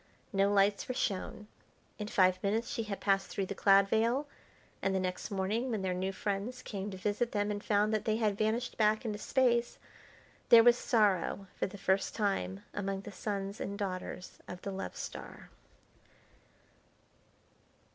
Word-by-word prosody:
No 195 +1 +3
lights 200 0 +3
were 255 - -3
shown. 210 +2 -2 0.5
In 210 - -3
five 185 -3 +3
minutes 215 +4 0
she - - -2
had 200 -2 -4
passed 195 -1 +2
through 195 - -2
the 195 - -4
cloud 195 0 +5
veil, 230 +7 +2 0.6
and 195 0 +1
the - - +2
next 185 0 -3
morning 205 +6 -1
when 215 -5 -2
their 185 -1 0
new 185 +1 -1
friends 205 +5 -3
came 200 -1 -4
to 190 - -7
visit 210 +5 -1
them 205 0 0
and 205 0 -4
found 210 +1 +2
that 215 - 0
they 215 - +2
had 215 -3 +1
vanished 220 +4 -1
back 215 +1 +3
into 210 -2 -3
Space, 240 -1 +2 0.7
there 230 -1 +9
was 240 0 +7
sorrow 205 -6 +1
for - - -1
the 200 +1 -10
first 195 0 0
time 100 - -1
among 195 -1 -2
the - - -9
sons 200 0 -4
and 200 +1 -4
daughters 185 -2 -5
of 180 0 -8
the 200 - -3
Love 195 0 -5
Star. - - -8
205 Hz, 170 wpm, -32 LUFS, 195-220 Hz, 0.7 s, there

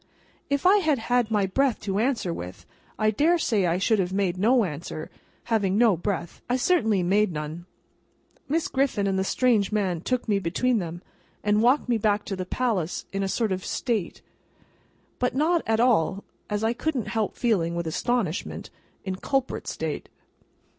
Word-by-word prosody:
If 280 +2 0
I 385 +3 +7
had 315 -7 +2
had 240 0 0
any 205 -2 +2
breath 260 +5 +1
to 195 0 -1
answer 230 -7 0
with, 90 - -8 0.3
I 215 0 +2
dare 315 +11 +3
say 215 - +1
I 170 +1 +1
should 210 +3 +2
have 180 -1 0
made 190 -2 0
no 230 +6 +3
answer; 155 -2 -5 0.3
having 205 -4 +1
no 225 -4 +5
breath, 175 -1 -4
I 245 - +2
certainly 235 - +2
made 200 +3 +2
none. 155 +3 -6 0.8
Miss 320 +3 +1
Griffin 265 -7 0
and 195 -1 +1
the - - +1
strange 220 -1 +2
man 190 -6 0
took 250 +5 -1
me 205 -2 +2
between 220 +7 +1
them, 175 0 -6 0.4
and 210 0 +3
walked 255 +5 +3
me 235 -2 +1
back 210 0 +1
to 195 - -3
the 185 -1 -5
palace 205 -10 -1
in 195 - -1
a 195 - 0
sort 220 0 0
of 185 0 -2
state; 220 -8 -2 1.0
but 250 0 0
not 325 +4 +2
at 220 0 +2
all 205 -6 +2 0.3
(as 210 +1 -1
I 225 +1 +2
couldn't 250 -2 -2
help 220 -2 -1
feeling, 180 -8 +1
with 170 0 -2
astonishment) 190 +2 -2 0.3
in 190 -1 -3
culprit 270 +4 -2
state. - - -4
210 Hz, 175 wpm, -25 LUFS, 185-245 Hz, 1.0 s, I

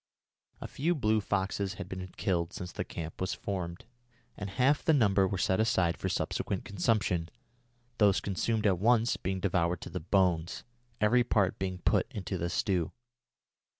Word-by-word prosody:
A - - -4
few 170 +6 0
blue 110 -6 +2
foxes 100 -1 -1
had - - -6
been 95 0 -6
killed 85 -1 0
since 90 -1 -6
the - - -3
camp 80 0 -7
was 95 - -1
formed, 90 -3 -4 0.5
and 100 - -5
half 130 +9 +2
the 160 - +4
number 100 -6 +4
were 95 - -2
set 95 +1 +1
aside 95 -7 +2
for - - -3
subsequent - - -2
consumption, 95 -4 0 0.7
those 100 -3 +5
consumed 110 +3 -1
at 95 -4 +3
once 115 +2 +3
being 95 +1 -3
devoured 90 -2 0
to - - -8
the - - -3
bones, 90 -1 +1 0.4
every 120 +4 +4
part 100 -6 +1
being 95 -1 -2
put 90 - +1
into 95 -2 -4
the 85 - -1
stew. 90 -3 0
95 Hz, 165 wpm, -30 LUFS, 90-105 Hz, 0.7 s, those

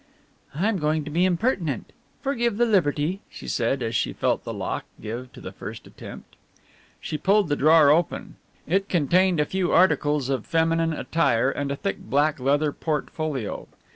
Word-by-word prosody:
"I 180 +8 +1
am 220 -4 0
going 155 0 0
to 150 - -6
be 175 +4 +2
impertinent. 180 - -1 0.3
Forgive 240 -6 0
the 240 - +4
liberty," 175 -4 +1
she - - -10
said, 125 +2 0
as 115 0 -2
she - - 0
felt - - 0
the - - -5
lock - - -4
give 120 +4 -6
to - - -12
the - - -7
first - - -9
attempt. - - -12 0.6
She 155 - -5
pulled 200 +1 +3
the 145 - +2
drawer 155 0 +6
open. 170 +3 0 0.3
It 195 +5 0
contained 175 +2 +2
a 150 - +3
few 185 +2 -1
articles 150 -6 +3
of 130 -5 -2
feminine 165 0 +1
attire 135 -6 +1
and 140 0 -3
a - - -1
thick 195 +7 -3
black 150 +2 +1
leather 145 +3 +1
portfolio. 150 -5 -3
155 Hz, 170 wpm, -24 LUFS, 140-185 Hz, 0.6 s, drawer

